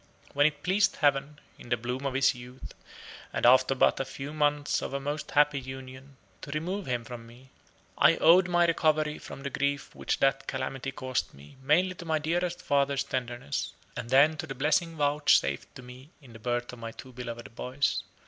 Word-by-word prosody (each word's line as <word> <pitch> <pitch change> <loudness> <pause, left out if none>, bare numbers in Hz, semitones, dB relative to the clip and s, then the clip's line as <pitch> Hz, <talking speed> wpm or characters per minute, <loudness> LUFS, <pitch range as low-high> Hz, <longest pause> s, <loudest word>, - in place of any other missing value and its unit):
When 145 +1 +5
it 145 -1 -5
pleased 195 +2 +2
heaven, 145 0 +1 0.2
in - - -12
the 120 - +2
bloom 125 +4 -3
of 135 - -4
his 135 -1 +4
youth, 125 +1 -11 0.6
and - - -1
after 130 +2 +6
but - - +3
a - - +1
few 135 +2 -7
months 145 -1 +1
of - - -4
a - - -1
most 145 +2 -4
happy 145 -1 +3
union, 130 +1 -10 0.2
to - - -9
remove 175 +6 -3
him 120 -2 -1
from 115 -1 -9
me, 125 +3 -17 0.5
I - - +6
owed 180 +3 +6
my 175 -1 +4
recovery 155 -2 +1
from 135 - -10
the 140 - -4
grief 140 +1 -2
which - - -2
that 135 0 +1
calamity 135 0 -3
caused 130 -1 -3
me, 70 +1 -15
mainly 170 +7 +3
to 170 - -10
my 160 -1 +1
dearest 175 +3 -2
father's 140 -1 +1
tenderness, 120 - -4 0.2
and 115 - -6
then 145 +4 +5
to 160 - -5
the 135 - -6
blessing 155 +5 +1
vouchsafed 145 - +2
to - - -10
me 125 +3 -12
in 130 -6 -16
the 115 - -11
birth 120 +1 -2
of 125 - -10
my 115 0 -6
two 130 +2 -12
beloved 120 -2 -8
boys. 130 +3 -1
135 Hz, 195 wpm, -28 LUFS, 125-150 Hz, 0.6 s, after